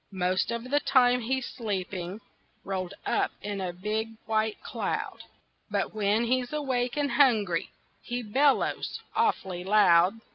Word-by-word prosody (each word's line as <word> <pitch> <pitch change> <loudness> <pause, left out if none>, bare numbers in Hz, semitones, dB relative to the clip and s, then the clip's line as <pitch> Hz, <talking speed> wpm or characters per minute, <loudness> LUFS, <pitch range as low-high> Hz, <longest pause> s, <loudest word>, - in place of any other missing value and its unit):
Most 185 +1 +1
of 235 +2 -4
the 290 - +4
time 250 -3 +4
he's 260 +2 -1
sleeping, 195 -3 -4 0.4
Rolled 190 -1 -4
up - - +1
in 205 -1 -3
a 185 -1 -2
big 215 +5 -3
white 220 -1 0
cloud, - - -3 0.5
But 200 -1 -1
when 215 +1 +1
he's 245 +1 0
awake 260 -4 -1
and 285 -2 0
hungry 220 - +3 0.3
He 245 0 -4
bellows 270 +6 +1 0.2
awfully 190 - 0
loud. 190 0 +5
220 Hz, 135 wpm, -28 LUFS, 190-250 Hz, 0.5 s, loud